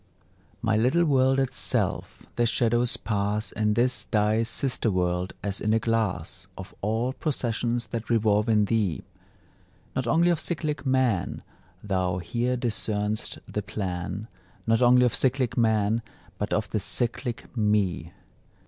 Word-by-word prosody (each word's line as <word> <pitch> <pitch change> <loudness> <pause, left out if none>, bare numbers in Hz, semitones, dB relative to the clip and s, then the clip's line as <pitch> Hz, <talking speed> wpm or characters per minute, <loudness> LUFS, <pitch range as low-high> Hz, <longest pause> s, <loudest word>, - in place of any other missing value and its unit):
My 110 -1 +2
little 130 +10 +3
worlded 135 -2 +2
self! - - -1
the 120 0 +2
shadows 120 +1 +1
pass 105 0 -1
In 105 0 0
this 125 +2 +1
thy 105 +1 +2
sister 115 +1 0
world, 90 -1 0
as 100 -1 -1
in 110 +1 +2
a - - +3
glass, 100 -6 -2
Of 95 - -9
all 115 +5 0
processions 120 -5 -1
that 115 0 -5
revolve 110 -1 +2
in 105 -2 +4
thee: 100 -6 0 0.9
Not 130 -2 -1
only 170 +8 +4
of 170 - 0
cyclic 155 -4 -3
Man 130 -8 +1 0.4
Thou 95 -3 0
here 120 +8 -1
discern'st 110 -3 -2
the 105 - -3
plan, 100 +1 -4 0.4
Not 115 +1 +2
only 125 0 +6
of 120 - +1
cyclic 130 -2 +1
Man, 110 -1 +2 0.4
but 105 - -2
of 105 0 0
the 105 - 0
cyclic 120 +4 -3
Me. 105 -7 +1
110 Hz, 140 wpm, -26 LUFS, 105-125 Hz, 0.9 s, only